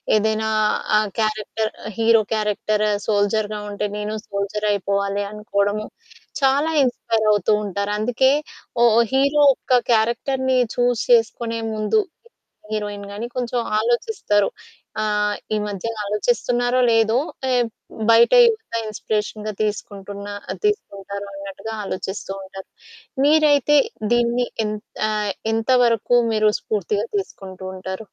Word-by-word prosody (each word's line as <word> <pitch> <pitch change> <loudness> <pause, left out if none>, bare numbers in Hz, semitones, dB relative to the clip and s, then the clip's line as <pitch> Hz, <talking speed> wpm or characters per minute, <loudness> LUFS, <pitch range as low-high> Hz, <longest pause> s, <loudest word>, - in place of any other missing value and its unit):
ఏదైనా 220 +1 +1 0.5
ఆహ్, 215 -1 +1
character, 215 0 -1 0.3
hero 225 0 +5
character 215 0 0 0.2
సోల్జర్‌గా 210 0 +1
ఉంటే 205 0 -2
"నేను 210 +1 -3
సోల్జర్‌గా 200 +1 -2
అయిపోవాలి." 200 0 -1
అనుకోవడం 210 -1 -1 0.6
చాలా 280 +4 +3
ఇన్స్పైర్ 230 -3 0
అవుతూ 205 0 +2
ఉంటారు. 200 +1 -2
అందుకే 245 +4 +3 0.5
ఓ - - +6 0.3
హీరో 280 +2 +3
ఒక 255 - -2 0.2
క్యారెక్టర్‌ని 255 +4 +1 0.2
చూస్ 245 -2 +1
చేసుకునే 230 0 +2
ముందు 215 - +1 0.7
హీరోయిన్‌గా 205 -1 -4
గాని 225 +4 -4
కొంచెం 245 0 -2 0.2
ఆలోచిస్తారు. 235 - +1 0.5
ఆహ్, 210 -1 0 0.2
ఈ - - +1
మధ్య 200 +1 -4 0.2
ఆలోచిస్తున్నారో 245 +4 0
లేదో 225 +1 +3 0.4
ఏ - - +3 0.6
బయట 230 - +6
యువత 445 - -1
ఇన్స్పిరేషన్‌గా 215 0 -3
తీసుకుంటారు 205 - -4
అన్నట్టుగా 195 +3 -7
ఆలోచిస్తూ 195 0 -5
ఉంటారు. 190 0 -10 0.6
మీరైతే 295 -2 +4 0.4
దీన్ని 240 +1 +2 0.6
ఆహ్, 210 -1 -1 0.2
ఎంత 225 +2 -2
వరకు 235 +1 +3 0.2
మీరు 215 0 +3
స్పూర్తిగా 210 +1 -1
తీసుకుంటూ 190 - -7
ఉంటారు. 190 +2 -6
215 Hz, 105 wpm, -21 LUFS, 205-240 Hz, 0.7 s, ఓ